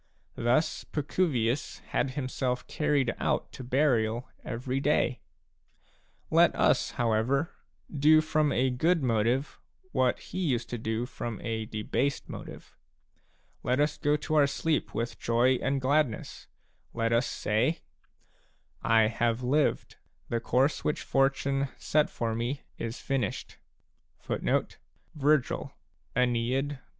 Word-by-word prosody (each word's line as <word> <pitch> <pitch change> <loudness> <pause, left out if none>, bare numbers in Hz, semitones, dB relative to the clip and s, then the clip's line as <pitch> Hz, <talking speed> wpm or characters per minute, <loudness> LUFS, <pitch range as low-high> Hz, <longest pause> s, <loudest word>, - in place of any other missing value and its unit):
" - - -41
Thus 120 +7 +1
Pacuvius 145 -5 -1
had 130 - 0
himself 130 -2 -2
carried 145 -5 +1
out - - 0
to - - -9
burial 125 -3 +1 0.2
every 125 +3 -3
day. 140 -2 +1 1.1
Let - - +5
us, - - +3
however, 120 +6 +1 0.4
do 155 +2 +6
from 155 -1 +1
a 130 +1 +2
good 160 +5 +2
motive 120 +3 0 0.3
what 130 -2 +2
he 185 - -7
used 130 -10 -1
to 120 - -3
do 110 +1 -2
from 120 -3 -5
a 110 -1 -2
debased 125 +6 -1
motive; - - -9 0.9
let 125 +2 0
us 150 0 +1
go 145 0 +2
to 150 +1 -4
oiir 145 -2 +5
sleep 150 +2 -1
with 115 +2 -3
joy 120 +2 +3
and 135 +2 0
gladness; 135 -2 0 0.5
let 115 0 +1
us 115 +3 +2
say: 120 +10 0 1.0
I 115 0 +4
have 115 +2 0
lived; 140 +4 +1 0.3
the 120 - 0
course 135 +5 +1
which 150 - -1
Fortune 135 0 +1
set 150 0 +1
for 115 -1 -2
me 120 +5 -3 0.2
Is 115 +2 -4
finished." 135 -2 -3
130 Hz, 120 wpm, -29 LUFS, 115-145 Hz, 1.1 s, do